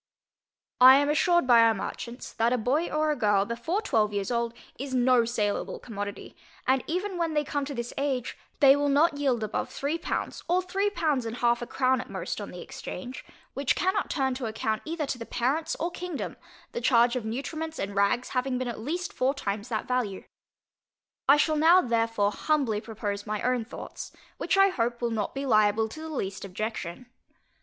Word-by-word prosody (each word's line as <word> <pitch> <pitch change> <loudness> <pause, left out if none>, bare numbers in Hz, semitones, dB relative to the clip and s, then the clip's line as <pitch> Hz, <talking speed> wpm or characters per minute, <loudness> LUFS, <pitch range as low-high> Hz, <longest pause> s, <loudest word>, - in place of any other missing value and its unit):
I 255 +1 +10
am 285 +1 +3
assured 345 +2 +3
by 240 -2 +7
our 225 -1 +5
merchants, 235 +4 -6
that 230 +1 +1
a - - +2
boy 270 +9 0
or 305 0 +1
a - - 0
girl, 205 -5 +2
before 320 - -2
twelve 215 - +2
years 200 +2 -2
old, 235 -1 -1 0.2
is 265 0 -3
no 250 -1 +4
saleable 215 -3 -1
commodity, 205 -3 -7 0.3
and 260 0 +2
even 365 +2 -2
when 330 -2 -1
they 300 - +2
come 285 0 -2
to 285 0 -6
this 235 0 -4
age, 265 -3 -1 0.3
they 275 -1 +8
will 285 0 +1
not 290 +2 +3
yield 260 -6 +1
above 215 - -2
three 295 +4 -2
pounds, - - -3
or 355 +1 +4
three 390 +3 0
pounds 295 - 0
and 225 +2 -5
half 240 0 +2
a 240 - -4
crown 260 -1 +1
at - - -11
most, - - -4
on - - -6
the - - -8
exchange; 255 0 -7 0.3
which 275 0 +1
cannot 380 +2 0
turn 265 -3 0
to 255 -2 -4
account 220 0 -2
either 320 -1 -2
to 260 -3 -4
the 230 - -6
parents 295 +7 0
or 340 +2 -1
kingdom, 355 -3 -5 0.4
the 480 0 -4
charge 240 -1 +4
of 250 - -2
nutriments 310 +8 -4
and 195 +1 -3
rags 200 +5 +1
having 255 0 -1
been 255 0 -2
at 235 - -5
least 335 +9 -3
four 265 +3 +1
times 205 -2 -3
that 220 -3 -2
value. 245 -7 -1 1.1
I 280 - +8
shall 310 +1 +2
now 330 +4 +7
therefore 225 - +1
humbly 255 -5 0
propose 210 -2 -5
my 210 0 -2
own 250 -2 +1
thoughts, 245 - -8 0.3
which - - 0
I 390 0 +6
hope 235 -7 -1
will 235 -1 -1
not 215 +1 -2
be 275 +1 -3
liable 215 -2 +3
to 310 - -9
the 320 - -6
least 195 -10 -4
objection. 200 +1 -5
250 Hz, 200 wpm, -27 LUFS, 225-300 Hz, 1.1 s, I